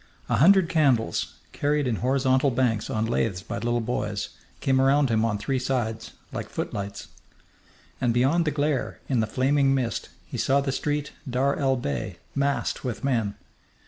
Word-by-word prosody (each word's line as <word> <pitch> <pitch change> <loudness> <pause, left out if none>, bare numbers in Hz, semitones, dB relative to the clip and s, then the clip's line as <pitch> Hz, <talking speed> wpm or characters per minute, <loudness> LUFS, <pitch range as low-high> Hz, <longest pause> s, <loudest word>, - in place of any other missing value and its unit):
A - - +2
hundred 190 +4 +6
candles, 135 - +1 0.2
carried 145 0 0
in 120 -4 0
horizontal 130 +2 +2
banks 120 -4 0
on 110 0 0
laths 110 -5 -1
by - - -5
little 120 +3 0
boys, 105 -3 -2 0.3
came 130 -1 +2
around 135 -1 +3
him 110 0 +2
on 115 -2 +1
three 130 +6 -1
sides, 115 -3 -2 0.2
like - - -4
footlights. 100 0 -5 0.9
And 120 - +2
beyond 135 +8 +3
the - - +2
glare, 145 -1 -1
in 130 -4 +1
the 110 - +1
flaming 135 +3 +2
mist, 120 -4 -2 0.2
he - - -6
saw 140 +1 +3
the 140 -1 -1
street 145 +2 -2 0.2
Dar 135 +3 +1
el 135 -2 +2
Bey 70 - -3 0.2
massed 140 0 0
with 125 -1 -4
men. 115 -7 0
130 Hz, 165 wpm, -26 LUFS, 115-140 Hz, 0.9 s, hundred